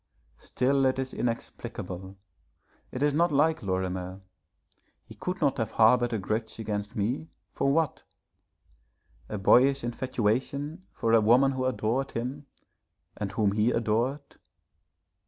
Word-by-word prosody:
Still 135 +1 +1
it 130 - 0
is 130 0 -3
inexplicable, 95 -5 -5 0.7
it 130 - -2
is 145 -1 +3
not 170 +3 +3
like 155 +2 +2
Lorimer. 95 -1 -3 0.8
He - - -12
could 180 +1 -4
not 140 -4 +1
have 110 -2 -1
harboured 120 +2 +4
a 115 - 0
grudge 110 +3 -3
against 105 -2 -4
me 120 +9 -1 0.3
for 140 - +1
what? 160 0 +1 1.3
A 105 - -3
boyish 135 +7 +4
infatuation 130 - -2
for 115 -3 0
a 115 - +6
woman 125 +5 +5
who 130 -1 -2
adored 130 +1 -1
him, 130 +5 -4 0.7
and 100 -2 -4
whom 105 -1 +2
he 105 +3 +2
adored. 120 +5 -1
120 Hz, 130 wpm, -28 LUFS, 105-135 Hz, 1.3 s, a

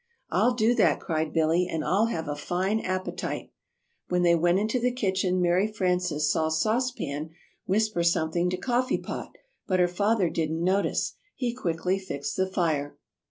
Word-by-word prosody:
"I'll 245 0 +3
do 230 0 +3
that," - - +3
cried 160 -3 -2
Billy, 165 +2 +2
"and 155 -2 -2
I'll 205 +5 +3
have 165 -8 -3
a 145 - -2
fine 185 +8 -1
appetite." 185 -2 -3 0.6
When 180 0 +1
they 170 -1 +5
went 175 +2 +3
into 215 +5 0
the 250 +1 +1
kitchen 190 -6 0
Mary 180 +3 +3
Frances 180 -6 0
saw 160 0 +1
Sauce 220 +11 +1
Pan 150 - -5 0.4
whisper 215 -1 +1
something 170 +1 +1
to 180 - -2
Coffee 250 +5 0
Pot, - - -7 0.3
but 185 -1 +1
her 180 - +5
father 200 0 +1
didn't 160 0 -1
notice. 190 +3 +1 0.2
He 245 -3 -2
quickly 180 -3 -1
fixed 145 -7 -5
the 190 0 +1
fire. 155 -6 -1
180 Hz, 165 wpm, -27 LUFS, 165-210 Hz, 0.6 s, they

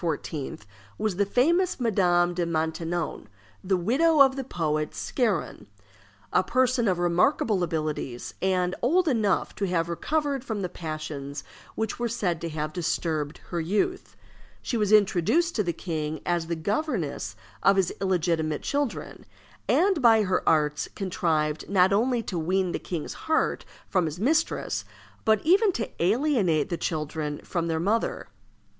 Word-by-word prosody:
was 210 -4 -1
the 200 0 +2
famous 340 - +2
Madame 180 -6 +2
de 175 0 -1
Maintenon, 165 -2 -2 0.4
the 190 0 +1
widow 285 - +3
of 270 -1 +7
the 270 - -3
poet 155 - -2
Scarron; 200 - -1 0.7
a - - +5
person 250 +2 +2
of 185 -2 +2
remarkable 180 - +2
abilities, 155 -7 -3
and 185 -1 +1
old 340 +8 +3
enough 220 -8 +1
to 200 - -2
have 170 -2 0
recovered 285 - -1
from 220 -6 -3
the 180 - -2
passions 155 -4 -6 0.3
which 220 0 -3
were 240 -1 0
said 180 -8 -1
to 170 - -3
have 155 -1 -4
disturbed 155 -3 -2
her 170 -2 -1
youth. 210 - -1 0.5
She - - -2
was 210 -3 +1
introduced 215 - +3
to - - +3
the 175 - 0
king 155 -2 -4
as 175 -2 0
the 170 - -1
governess 170 - -2 0.3
of 195 - +5
his 190 -2 +1
illegitimate 165 -5 0
children, 285 -4 -3 0.5
and 380 -4 +3
by 225 -3 +6
her 185 -2 +1
arts 150 -2 +1
contrived 165 -6 -1
not 190 -1 +4
only 235 +3 +2
to 180 -4 -3
wean 185 +2 0
the - - -2
king's 170 -4 -5 0.2
heart 320 - +1 0.2
from 185 -3 +1
his 155 +2 -4
mistress, 310 +9 0 0.4
but 220 +2 +3
even 390 +5 +5
to 225 -8 -2
alienate 200 - +2
the 170 - -1
children 150 -2 -3
from 170 -2 -2
their 160 -1 0
mother. 210 +7 0
185 Hz, 150 wpm, -26 LUFS, 165-235 Hz, 0.7 s, of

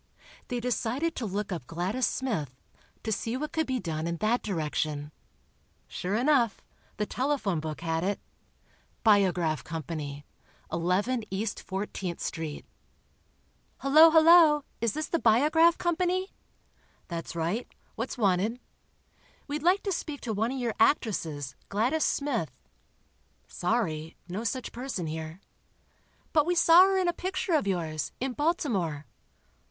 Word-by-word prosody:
They 245 - -2
decided 250 +6 -1
to 230 - -2
look 200 +1 -3
up 165 -8 -5
Gladys 190 +9 -1
Smith, 160 - -2 0.5
to 220 - -2
see 225 +3 -2
what 300 +3 -4
could 320 -1 -1
be 260 -1 -1
done 160 -4 -3
in 170 0 -2
that 215 +6 +1
direction. 155 -5 -2 0.8
Sure 185 +3 -3
enough, 245 -3 +3 0.4
the 210 - 0
telephone 255 - -1
book 155 0 -5
had 165 0 -1
it: 200 +1 -1 0.8
"Biograph 185 -7 +3
Co., 165 0 -5 0.9
11 190 +9 +1
E. 195 +3 -2
14th 195 -4 -4
St." 160 -3 -4 1.1
"Hello, 310 +4 +7
hello! 320 -2 +7 0.2
Is 230 -2 0
this 310 0 -2
the 335 - -1
Biograph 305 +9 +4
Company?" 365 +2 0 0.7
"That's 170 -1 -5
right. 170 +9 -2 0.2
What's 230 +4 -4
wanted?" 210 +2 +1 0.9
"We'd 295 +1 -3
like 360 +5 +3
to 395 - -1
speak 305 -5 -4
to 225 - -3
one 220 +4 0
of 270 - -3
your 240 -3 -1
actresses, 160 - +1 0.2
Gladys 245 +10 +1
Smith." 265 - 0 1.0
"Sorry—no 175 -1 -2
such 255 +2 -2
person 245 -7 -4
here." 160 +3 -6 0.9
"But 305 -1 +4
we 355 - +2
saw 345 +2 +8
her 390 0 +2
in 370 -1 +1
a 345 - +2
picture 370 0 -2
of 300 -10 +2
yours, 160 -5 -2
in 265 0 -2
Baltimore." 220 - -1
225 Hz, 135 wpm, -28 LUFS, -, 1.1 s, saw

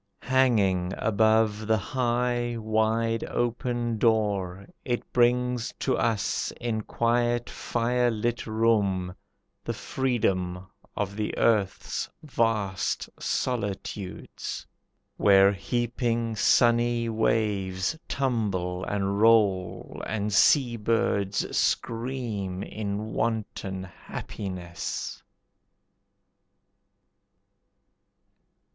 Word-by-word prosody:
Hanging 100 -9 +2
above 110 0 +2
the 110 0 +3
high, 120 +1 0
wide 110 +1 +1
open 120 -1 -1
door, 100 -5 +1 0.2
It 120 -2 -3
brings 125 0 +2
to 130 - 0
us 110 -3 0
in 115 -3 -1
quiet, 120 +2 0
firelit 120 -1 0
room, 105 -5 +1 0.5
The - - -3
freedom 95 -8 -1 0.3
of 100 -1 -2
the 105 -1 -2
earth's 105 -4 +1
vast 115 -9 -1
solitudes, 100 -4 -3 0.5
Where 100 -1 +6
heaping, 115 +2 -1
sunny 120 +1 +3
waves 105 -3 0
tumble 100 -9 -1
and 100 0 -1
roll, 105 -5 +2
And 105 -1 -2
seabirds 110 -4 +2
scream 115 -6 -1
in 105 +1 -4
wanton 105 -4 -2
happiness. 90 -1 -6
110 Hz, 75 wpm, -27 LUFS, 100-120 Hz, 0.5 s, Where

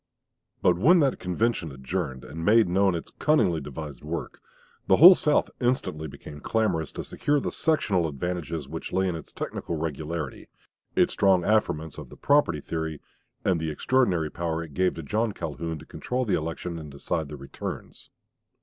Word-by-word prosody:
But 90 -1 +4
when 170 - +6
that 135 -3 +1
convention 90 -2 -1
adjourned, 65 0 -4
and 80 +2 -7
made 110 +3 +5
known 95 +1 +3
its 85 - -6
cunningly 105 - +3
devised 75 -2 -7
work, 80 +2 -5 0.5
the - - +6
whole 180 +5 +11
South 150 -4 +1
instantly 120 -11 -1
became 75 +1 -10
clamorous 90 -6 0
to - - -5
secure 145 0 0
the - - -3
sectional 100 - +1
advantages 80 0 -4
which 80 +3 -6
lay 95 0 +1
in 90 - -1
its 80 - -9
technical 85 - -4
regularity, 80 -1 -4 0.5
its - - +3
strong 95 -3 +4
affirmance 80 -8 0
of - - -9
the - - -13
"property" 140 - +3
theory, 80 -1 -4 0.5
and 90 -3 +2
the 80 0 -2
extraordinary 90 - +1
power 85 -1 -2
it 80 -3 -11
gave 90 +2 +1
to 80 - -6
John 110 +8 0
Calhoun 80 -1 -4
to - - -12
control 125 +1 -3
the 105 - 0
election 80 +2 -3
and 75 -2 -8
decide 70 +2 -3
the 75 - -7
returns. 70 0 -7
85 Hz, 170 wpm, -26 LUFS, 75-105 Hz, 0.5 s, whole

